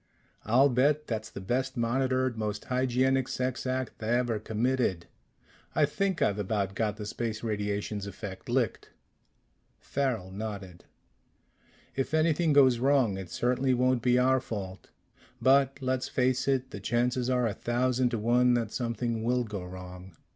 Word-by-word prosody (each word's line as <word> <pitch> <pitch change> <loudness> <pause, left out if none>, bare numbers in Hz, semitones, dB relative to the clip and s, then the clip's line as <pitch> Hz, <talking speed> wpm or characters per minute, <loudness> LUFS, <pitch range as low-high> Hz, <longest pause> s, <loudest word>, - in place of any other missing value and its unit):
"I'll 130 +6 +5
bet 145 +4 +2
that's 110 -1 -4
the - - -8
best 125 +7 -2
monitored, 130 +1 +1
most 105 -1 -3
hygienic 130 +1 +1
sex 130 0 -2
act 130 -2 -3
ever 120 0 0
committed. 110 -4 0 0.7
I - - +5
think 195 -3 0
I've 100 0 +1
about 100 -1 -1
got 105 0 -1
the 105 - -6
space 110 +1 -4
radiations 105 -1 -2
effect 100 +1 -8
licked." 120 -3 0 0.9
Farrel 125 -9 -2
nodded. 100 -3 -7 1.1
"If 135 +3 -1
anything 160 +1 +2
goes 130 -4 +5
wrong, 130 -5 +3
it 95 -2 -7
certainly 125 +1 +1
won't 125 0 +2
be 125 +1 +3
our 130 +1 +4
fault. 95 -6 -7 0.5
But 135 0 +4
let's 130 0 -1
face 130 +1 +1
it 130 -1 0
the 100 - -6
chances 120 +4 0
are 125 -1 +2
a 110 - 0
thousand 125 +2 0
to 120 - -2
one 120 +3 +3
that 115 -3 -1
something 115 -2 -2
will 125 +1 +1
go 105 -5 -6
wrong. 90 -1 -10
120 Hz, 145 wpm, -29 LUFS, 105-130 Hz, 1.1 s, I'll